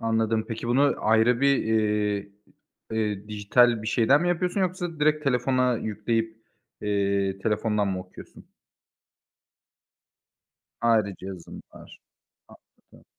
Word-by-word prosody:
Anladım 110 Hz, -1 st, 0 dB
peki 115 Hz, +1 st, -5 dB
bunu 140 Hz, +4 st, +3 dB
ayrı 115 Hz, +3 st, +3 dB
bir, 140 Hz, 0 st, +4 dB
eee, 105 Hz, -2 st, 0 dB, 0.6 s
eee, 105 Hz, -2 st, -2 dB
dijital 110 Hz, +2 st, +2 dB
bir 110 Hz, -, -7 dB
şeyden 125 Hz, +6 st, +3 dB
mi 175 Hz, -, 0 dB
yapıyorsun 180 Hz, +3 st, -1 dB
yoksa 175 Hz, -3 st, -3 dB
direkt 150 Hz, 0 st, +2 dB
telefona 125 Hz, -1 st, +1 dB
yükleyip, 110 Hz, +1 st, -2 dB, 0.4 s
eee, 100 Hz, -1 st, 0 dB
telefondan 105 Hz, 0 st, 0 dB
mı 95 Hz, -1 st, -2 dB
okuyorsun? 90 Hz, 0 st, -13 dB, 2.4 s
Ayrıca 110 Hz, -5 st, +2 dB
cihazın 95 Hz, -3 st, -9 dB
var. -, -, -14 dB, 0.5 s
Anladım. -, -, -22 dB
110 Hz, 110 wpm, -25 LUFS, 105-125 Hz, 2.4 s, bir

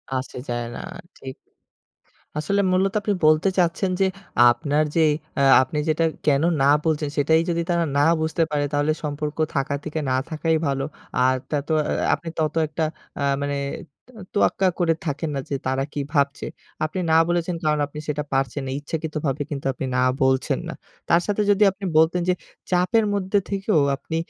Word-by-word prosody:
আসে 130 Hz, 0 st, -4 dB
যায় 120 Hz, -1 st, -2 dB
না। -, -, -6 dB, 0.4 s
ঠিক। 130 Hz, -1 st, -8 dB, 1.0 s
আসলে 200 Hz, +7 st, +1 dB
মূলত 190 Hz, +1 st, +2 dB
আপনি 205 Hz, 0 st, 0 dB
বলতে 155 Hz, +5 st, +4 dB
চাচ্ছেন 180 Hz, +2 st, +1 dB
যে -, -, +5 dB, 0.5 s
আপনার 145 Hz, +3 st, 0 dB
যে 165 Hz, -, +4 dB, 0.4 s
আ -, -, +3 dB, 0.2 s
আপনি 130 Hz, +3 st, -3 dB
যেটা 155 Hz, +1 st, +2 dB, 0.2 s
কেনো 145 Hz, +2 st, +3 dB
না -, -, +4 dB, 0.2 s
বলছেন 155 Hz, -2 st, 0 dB
সেটাই 160 Hz, +3 st, +4 dB
যদি 170 Hz, 0 st, 0 dB
তারা 170 Hz, -1 st, +2 dB
না -, -, +4 dB, 0.2 s
বুঝতে 160 Hz, +1 st, 0 dB
পারে 145 Hz, -1 st, +1 dB
তাহলে 145 Hz, +1 st, +1 dB
সম্পর্ক 150 Hz, 0 st, -3 dB, 0.2 s
থাকা 140 Hz, 0 st, 0 dB
থেকে 155 Hz, 0 st, -3 dB
না 130 Hz, -, +2 dB
থাকাই 160 Hz, 0 st, 0 dB
ভালো। 135 Hz, -1 st, -1 dB, 0.3 s
আর 130 Hz, +1 st, +3 dB
তত 145 Hz, -1 st, -2 dB
আ -, -, +3 dB, 0.3 s
আপনি 170 Hz, -, -4 dB
তত 155 Hz, -1 st, 0 dB
একটা 155 Hz, +2 st, -3 dB, 0.4 s
আ -, -, -3 dB, 0.2 s
মানে 145 Hz, 0 st, -1 dB, 0.5 s
ত -, -, -24 dB, 0.2 s
তোয়াক্কা 195 Hz, -2 st, +2 dB
করে 170 Hz, -2 st, +3 dB
থাকেন 155 Hz, +1 st, -2 dB
না -, -, -1 dB
যে 140 Hz, -, -1 dB
তারা 130 Hz, +1 st, 0 dB
কি -, -, -3 dB
ভাবছে। 140 Hz, -2 st, +1 dB, 0.4 s
আপনি 155 Hz, +4 st, -2 dB
না -, -, +5 dB
বলেছেন 175 Hz, 0 st, 0 dB
কারণ 150 Hz, -1 st, +2 dB
আপনি 150 Hz, +1 st, -9 dB
সেটা 150 Hz, 0 st, -2 dB
পারছেন 135 Hz, +1 st, 0 dB
না। -, -, -3 dB
ইচ্ছাকৃতভাবে 150 Hz, -2 st, -3 dB
কিন্তু 140 Hz, -3 st, -5 dB
আপনি 135 Hz, -, -4 dB
না 125 Hz, -, +2 dB, 0.2 s
বলছেন 130 Hz, 0 st, +1 dB
না। -, -, -5 dB, 0.4 s
তার 170 Hz, -, +5 dB
সাথে 205 Hz, 0 st, 0 dB
যদি 205 Hz, +1 st, +4 dB
আপনি 195 Hz, +1 st, -8 dB
বলতেন 160 Hz, +3 st, +4 dB
যে -, -, +5 dB, 0.4 s
চাপের 185 Hz, +5 st, +3 dB
মধ্যে 200 Hz, 0 st, 0 dB
থেকেও 195 Hz, -3 st, +1 dB, 0.2 s
আপনি 160 Hz, -, -6 dB
155 Hz, 180 wpm, -23 LUFS, 140-175 Hz, 1.0 s, যে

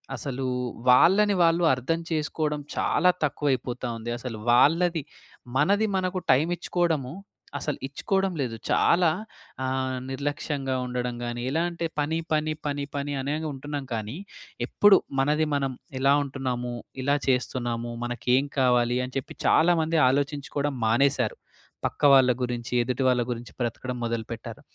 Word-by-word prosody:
అసలు 135 Hz, -2 st, -4 dB, 0.4 s
వాళ్ళని 195 Hz, +11 st, +6 dB
వాళ్ళు 170 Hz, +1 st, +3 dB
అర్థం 135 Hz, +6 st, -1 dB
చేసుకోవడం 150 Hz, -1 st, -1 dB, 0.2 s
చాలా 180 Hz, -, +3 dB
తక్కువ 145 Hz, 0 st, 0 dB
అయిపోతా 125 Hz, 0 st, -4 dB
ఉంది. 115 Hz, +1 st, -6 dB
అసలు 120 Hz, -3 st, -6 dB
వాళ్ళది 165 Hz, +5 st, +4 dB, 0.5 s
మనది 200 Hz, +9 st, +3 dB
మనకు 185 Hz, 0 st, -1 dB
టైమ్ 140 Hz, +6 st, +3 dB
ఇచ్చుకోవడము, 165 Hz, -7 st, -1 dB, 0.5 s
అసలు 145 Hz, 0 st, -3 dB
ఇచ్చుకోవడం 190 Hz, +7 st, -1 dB
లేదు. 120 Hz, -4 st, -2 dB
చాలా 170 Hz, -1 st, +4 dB, 0.5 s
ఆహ్, 130 Hz, 0 st, -1 dB
నిర్లక్ష్యంగా 140 Hz, 0 st, -2 dB
ఉండడం 125 Hz, -1 st, -3 dB
గాని, 120 Hz, 0 st, -4 dB
ఎలా 160 Hz, +5 st, 0 dB
అంటే 170 Hz, 0 st, -4 dB
పని, 150 Hz, +2 st, 0 dB, 0.2 s
పని, 155 Hz, 0 st, +1 dB
పని, 145 Hz, -1 st, -2 dB
పని 145 Hz, 0 st, -2 dB
అనే 140 Hz, +3 st, -1 dB, 0.2 s
ఉంటున్నాం. 145 Hz, +1 st, -5 dB
కానీ 110 Hz, +2 st, -4 dB, 0.5 s
ఎప్పుడు 205 Hz, -2 st, +6 dB, 0.2 s
మనది 150 Hz, +3 st, +2 dB
మనం 135 Hz, -2 st, -1 dB, 0.3 s
ఎలా 135 Hz, +1 st, +4 dB
ఉంటున్నాము, 130 Hz, -3 st, -3 dB, 0.3 s
ఇలా 140 Hz, +2 st, +2 dB
చేస్తున్నాము, 120 Hz, -2 st, -1 dB
మనకు 120 Hz, 0 st, -5 dB
ఏం 135 Hz, +2 st, +2 dB
కావాలి? 125 Hz, -1 st, +3 dB
అని 125 Hz, -, -11 dB
చెప్పి, 135 Hz, -, -5 dB
చాలామంది 165 Hz, -1 st, +3 dB
ఆలోచించుకోవడం 140 Hz, +1 st, -1 dB
మానేశారు. 125 Hz, 0 st, +2 dB, 0.5 s
పక్క -, -, -11 dB
వాళ్ళ 130 Hz, -2 st, +6 dB
గురించి 120 Hz, 0 st, -4 dB
ఎదుటి 125 Hz, +2 st, -1 dB
వాళ్ళ 125 Hz, -1 st, +2 dB
గురించి 120 Hz, 0 st, -6 dB
బ్రతకడం 125 Hz, +2 st, -3 dB
మొదలుపెట్టారు. 115 Hz, +2 st, -5 dB
135 Hz, 135 wpm, -26 LUFS, 125-155 Hz, 0.5 s, వాళ్ళని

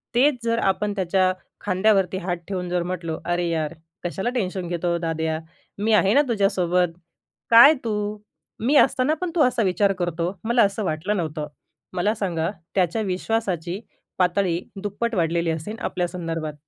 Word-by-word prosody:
तेच 275 Hz, +3 st, +4 dB
जर 230 Hz, 0 st, +1 dB
आपण 205 Hz, +2 st, 0 dB
त्याच्या 185 Hz, 0 st, +2 dB, 0.3 s
खांद्यावरती 190 Hz, -1 st, +2 dB
हात 175 Hz, -1 st, -2 dB
ठेवून 180 Hz, -2 st, -3 dB
जर 175 Hz, -1 st, 0 dB
म्हटलो, 170 Hz, -3 st, -4 dB
“अरे 175 Hz, 0 st, 0 dB
यार, 160 Hz, -1 st, -1 dB, 0.3 s
कशाला 190 Hz, +6 st, -2 dB
टेन्शन 185 Hz, -5 st, -2 dB
घेतो, 175 Hz, 0 st, -1 dB
दाद्या, 160 Hz, -1 st, -2 dB, 0.4 s
मी 215 Hz, +2 st, +1 dB
आहे 200 Hz, -1 st, +4 dB
ना 285 Hz, -, +6 dB
तुझ्यासोबत, 180 Hz, -6 st, +1 dB, 0.5 s
काय 235 Hz, +7 st, +9 dB
तू? 210 Hz, -1 st, -2 dB, 0.4 s
मी 260 Hz, +7 st, +1 dB
असताना 270 Hz, +1 st, +4 dB
पण 360 Hz, -2 st, -2 dB
तू 320 Hz, -, +3 dB
असा 250 Hz, -2 st, +2 dB
विचार 195 Hz, +1 st, +2 dB
करतो? 175 Hz, +1 st, -1 dB
मला 235 Hz, +1 st, +4 dB
असं 200 Hz, +1 st, 0 dB
वाटलं 185 Hz, +5 st, -1 dB
नव्हतं." 155 Hz, -3 st, -3 dB, 0.5 s
मला 200 Hz, +4 st, +1 dB
सांगा, 170 Hz, -5 st, -1 dB, 0.3 s
त्याच्या 185 Hz, +3 st, +1 dB
विश्वासाची 185 Hz, -2 st, -2 dB, 0.4 s
पातळी 180 Hz, -1 st, +2 dB, 0.2 s
दुप्पट 225 Hz, +3 st, -2 dB
वाढलेली 170 Hz, -1 st, +1 dB
असेन 160 Hz, +7 st, -4 dB
आपल्यासंदर्भात. 165 Hz, -6 st, -3 dB
185 Hz, 150 wpm, -23 LUFS, 170-210 Hz, 0.5 s, काय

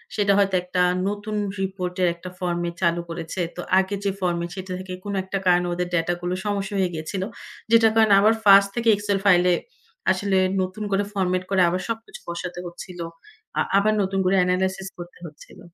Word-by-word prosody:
সেটা 205 Hz, -1 st, +2 dB
হয়তো 195 Hz, -1 st, +2 dB
একটা 180 Hz, 0 st, -1 dB, 0.3 s
নতুন 205 Hz, +1 st, -3 dB, 0.3 s
রিপোর্টের 185 Hz, -1 st, -1 dB
একটা 180 Hz, +1 st, -9 dB
ফরমেট 175 Hz, -1 st, -2 dB
চালু 170 Hz, -1 st, +2 dB
করেছে। 165 Hz, +2 st, -4 dB
তো 180 Hz, -, -5 dB, 0.2 s
আগে 190 Hz, +1 st, -1 dB
যে, 200 Hz, -, +1 dB
ফরমেট, 175 Hz, -2 st, -1 dB
সেটা 190 Hz, -1 st, -7 dB
থেকে 185 Hz, -1 st, -7 dB
কোন 205 Hz, -, -4 dB
একটা 195 Hz, +1 st, -3 dB
কারণে 180 Hz, 0 st, +3 dB
ওদের 180 Hz, 0 st, -2 dB
ড্যাটাগুলো 175 Hz, +1 st, -1 dB
সমস্যা 205 Hz, 0 st, -2 dB
হয়ে 185 Hz, -2 st, +1 dB
গিয়েছিল। 165 Hz, +4 st, -4 dB, 0.5 s
যেটার 225 Hz, -1 st, +6 dB
কারণে 220 Hz, -2 st, +5 dB
আবার 215 Hz, +2 st, +5 dB
ফার্স্ট 200 Hz, -1 st, +7 dB
থেকে 235 Hz, -1 st, +1 dB
এক্সেল 205 Hz, -1 st, -1 dB
ফাইলে 180 Hz, -2 st, +5 dB, 0.6 s
আসলে 190 Hz, 0 st, 0 dB, 0.2 s
নতুন 185 Hz, +3 st, -4 dB
করে 195 Hz, +1 st, +2 dB
ফরমেট 185 Hz, -2 st, 0 dB
করে 195 Hz, -1 st, +3 dB
আবার 180 Hz, +2 st, -2 dB
সবকিছু 225 Hz, 0 st, -5 dB
বসাতে 175 Hz, +1 st, -5 dB
হচ্ছিল। 175 Hz, +1 st, -9 dB, 0.6 s
আ -, -, +4 dB, 0.2 s
আবার 215 Hz, +2 st, +3 dB
নতুন 195 Hz, 0 st, -1 dB
করে 185 Hz, +1 st, +3 dB
এনালাইসিস 190 Hz, +1 st, -1 dB
করতে 175 Hz, 0 st, -10 dB
হচ্ছিল। 150 Hz, -3 st, -13 dB
185 Hz, 175 wpm, -23 LUFS, 175-200 Hz, 0.6 s, ফার্স্ট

